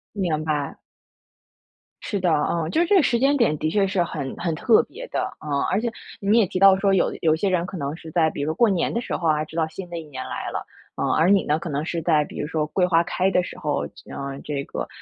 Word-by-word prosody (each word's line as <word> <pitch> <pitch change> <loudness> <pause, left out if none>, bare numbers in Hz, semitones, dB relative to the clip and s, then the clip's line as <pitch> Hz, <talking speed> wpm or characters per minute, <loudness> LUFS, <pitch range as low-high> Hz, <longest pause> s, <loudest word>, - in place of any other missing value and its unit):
明 165 -6 -1
白。 150 -3 -2 1.3
是 200 - -2
的， 180 -2 +2 0.2
嗯， 165 -1 -1
就 - - +1
是 345 - +2
这 410 - +4
个 365 - +7
时 235 - +2
间 275 +2 +3
点 210 - +2
的 155 - -1
确 200 +3 +2
是 190 -3 +1
很 140 -5 -5
很 170 -2 -1
特 225 +7 +4
别 - - -10
的。 - - -2
呃， 145 -2 -2
而 205 - +1
且 235 -1 -1 0.3
你 210 +3 +3
也 220 - +5
提 185 - -3
到 195 -1 +8
说， 195 0 +2
有 185 - +2
有 160 -1 +3
些 195 +4 0
人 180 -1 +1
可 190 - -7
能 145 +1 -3
是 160 -1 -11
在 160 -3 +3
比 145 - -6
如 - - -1
说 155 - 0
过 235 +1 +4
年 185 -3 0
的 235 - -1
时 - - -3
候 170 - -1
啊， 155 0 +2
知 160 - -13
道 160 -1 +2
新 175 +2 -8
的 170 - -5
一 165 - -5
年 130 -3 -7
来 - - -4
了。 - - -4 0.3
呃， - - -1
而 165 +4 +3
你 200 -1 +5
呢， 150 +2 +1
可 170 - -6
能 145 +2 -2
是 170 -1 -2
在 155 -2 +3
比 - - -9
如 150 - -2
说 155 -1 -1
桂 180 +3 +1
花 170 -1 +4
开 185 +2 0
的 180 -1 +2
时 - - -8
候， 150 -1 -1 0.3
呃， 140 0 -5
这 140 -2 -3
个， - - -5
170 Hz, 290 characters per minute, -23 LUFS, 155-195 Hz, 1.3 s, 到